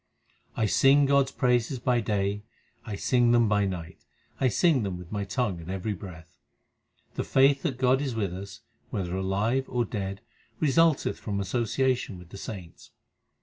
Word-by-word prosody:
I 110 - +2
sing 135 +6 +5
God 140 0 +4
s - - -8
praises 125 -1 +1
by 125 0 +1
day, 100 -1 -1 0.4
I 105 - -5
sing 120 +3 +2
them 120 -1 +4
by 105 -1 +2
night, 90 -3 -7 0.4
I 130 - +3
sing 150 +2 +3
them 95 -4 -3
with 90 0 -11
my 100 -1 -2
tongue 95 -3 -2
at 80 - -10
every 95 +3 -2
breath. 85 -6 -11 0.7
The - - -2
faith 135 +1 +4
that 135 -7 -2
God 130 +1 +3
is 135 -5 -2
with 100 -5 -1
us 100 +1 -8 0.3
whether 90 -2 -3
alive 100 +8 0
or 120 -1 0
dead 100 -2 -4 0.4
result 155 +1 +3
eth - - -2
from 100 -2 -3
association 120 +2 0
with 90 -1 -13
the 100 - -10
saints. 95 -5 -9
110 Hz, 175 wpm, -27 LUFS, 95-130 Hz, 0.7 s, sing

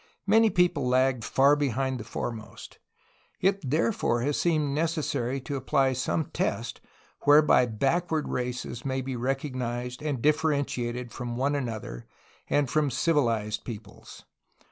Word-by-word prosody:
Many 220 +2 +5
people 175 -8 +2
lagged 130 -1 +2
far 140 +6 +4
behind 135 -2 -1
the - - -6
foremost. 115 0 -7 0.6
It 195 +1 +2
therefore 155 - +1
has 145 +3 0
seemed 155 -5 +1
necessary 150 -5 -1
to 140 +2 -5
apply 135 0 +2
some 130 +5 -1
test - - -2 0.4
whereby 145 -3 +6
backward 155 +8 0
races 125 -1 -4
may 130 -1 -1
be 130 0 -4
recognized 125 -1 -3
and 145 -4 -2
differentiated 140 -5 0
from 120 0 -5
one 140 +3 +1
another 110 - -4 0.4
and 145 -1 +2
from 150 +2 +1
civilized 115 -7 0
peo 115 -4 -5
ples. 100 - -15
135 Hz, 130 wpm, -27 LUFS, 120-150 Hz, 0.6 s, whereby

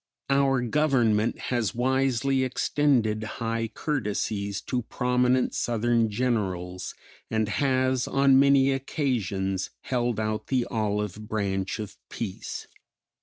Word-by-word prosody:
Our 135 -2 +3
Government 120 -5 +2 0.2
has 115 -4 0
wisely 130 +1 +1
extended 125 -4 +1 0.2
high 115 -1 -1
courtesies 105 -8 -2
to 125 - -2
prominent 125 +1 +1
Southern 115 -1 +1
Generals, 95 -6 -2 0.3
and 110 -1 0
has 130 +1 +1
on 135 -1 +5
many 140 -1 +5
occasions 105 - -1
held 120 -3 -1
out 110 0 -2
the 125 -3 +1
olive 105 -2 -2
branch 95 -3 -1
of 105 -2 -7
peace. 105 -5 -5
120 Hz, 105 wpm, -26 LUFS, 105-130 Hz, 0.3 s, on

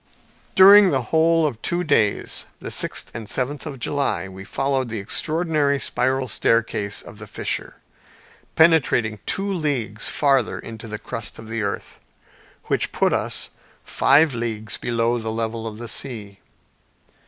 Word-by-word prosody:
During 200 +1 +9
the - - 0
whole 165 0 +4
of 120 -7 -3
two 175 +1 -1
days, 115 - +1
the - - -6
sixth - - -1
and 110 -2 -7
seventh 140 +6 -2
of 140 -3 -6
July, 140 -5 -1
we 95 0 -10
followed 135 +5 -1
the 115 - -4
extraordinary 155 - 0
spiral 130 0 -1
staircase 110 -4 0
of - - -13
the - - -9
fissure, - - -4 0.8
penetrating 145 -10 +3
two 200 0 0
leagues 130 - -2
farther 140 -2 +1
into 115 0 -9
the 105 0 -5
crust 115 +1 -4
of 110 -1 -11
the 115 0 -2
earth, 100 -1 -4 0.6
which - - -1
put - - +1
us - - -1 0.3
five 145 +1 +4
leagues 110 -2 -4
below 120 0 0
the 110 -1 -3
level 115 0 -3
of 110 -1 -7
the 120 +1 -7
sea. 105 -6 -5
120 Hz, 145 wpm, -22 LUFS, 110-150 Hz, 0.8 s, During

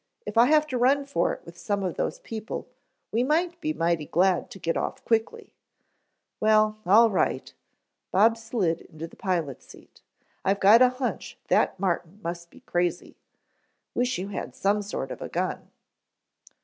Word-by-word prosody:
If - - -6
I 235 +2 +6
have 305 +1 +4
to 260 -5 -3
run 275 +3 +3
for 275 -11 0
it - - -8
with 170 +1 -12
some 200 +3 -1
of 180 -3 -1
those - - -2
people, 220 0 -6 0.4
we 230 - +1
might 335 +5 0
be 310 - -1
mighty 170 - 0
glad 180 +1 +2
to - - -10
get 165 -3 -2
off - - -3
quickly." 230 - -1 0.9
"Well, 215 0 +3
all 225 +4 +6
right." 190 - -1 0.6
Bob 220 +4 +5
slid 205 -7 -1
into 155 +1 -9
the 165 - -13
pilot's 170 -9 -3
seat. - - -17 0.4
"I've 195 +1 +1
got 210 +5 +7
a 255 - +7
hunch 255 0 -4
that - - +2
Martin 180 0 -2
must 170 0 -5
be - - -18
crazy. 175 0 -2 0.8
Wish 245 +1 0
you 190 +2 -4
had 205 - -6
some 205 +1 +1
sort 205 +1 -5
of - - -7
gun." - - -3
205 Hz, 165 wpm, -26 LUFS, 175-245 Hz, 0.9 s, got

